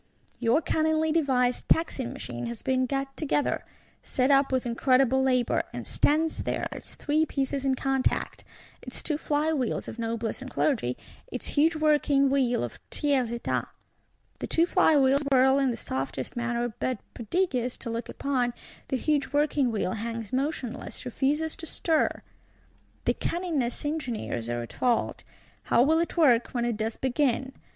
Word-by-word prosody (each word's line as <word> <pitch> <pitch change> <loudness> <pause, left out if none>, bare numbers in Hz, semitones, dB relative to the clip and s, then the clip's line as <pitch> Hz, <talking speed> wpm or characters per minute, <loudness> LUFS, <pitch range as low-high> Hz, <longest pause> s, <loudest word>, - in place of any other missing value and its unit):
Your 245 +6 +2
cunningly 315 0 +1
devised 260 -6 +1
Taxing 280 -6 +1
Machine 120 0 -5
has 120 0 -7
been 255 -1 +1
got 275 +1 -2
together; 295 -1 0 0.4
set 260 +2 +1
up 275 0 +4
with 260 -1 0
incredible 255 +2 +3
labour; 255 -2 +2
and - - -5
stands 315 +2 +1
there, - - -2
its - - -8
three 300 +2 +1
pieces 275 -2 -2
in 265 -1 +2
contact; 270 0 -1 0.4
its - - -8
two 305 - 0
fly 305 +1 +1
wheels 260 -6 -1
of 235 - -7
Noblesse 230 +1 -2
and 265 - -6
Clergy, 220 - 0 0.3
its - - -4
huge 320 +3 +3
working 295 -3 +3
wheel 255 - +2
of 120 - -6
Tiers 270 -6 +1
Etat. 235 0 -2 0.7
The - - -4
two 335 - +3
fly 350 -4 +4
wheels 275 +1 +4
whirl 265 +1 +5
in 270 -1 +2
the 235 - -2
softest 130 - -4
manner; 240 -1 -1
but, 255 -2 -1 0.2
prodigious 250 - -1
to 230 - -5
look 230 +1 -4
upon, 250 -4 -1 0.3
the 265 - 0
huge 290 +1 0
working 290 -3 +2
wheel 205 -4 -1
hangs 230 +1 -5
motionless, 260 -3 -3
refuses 290 +6 0
to 325 - -8
stir! 320 0 0 0.8
The - - +3
cunningest 315 -9 -2
engineers 240 - -3
are 120 0 -2
at 115 - -10
fault. 245 -2 0 0.4
How 235 - +4
will 320 +4 +3
it 340 +1 -2
work, 250 -8 +5
when 240 -1 +1
it 240 -2 0
does 220 +1 -2
begin? 265 0 0
265 Hz, 160 wpm, -27 LUFS, 235-295 Hz, 0.8 s, whirl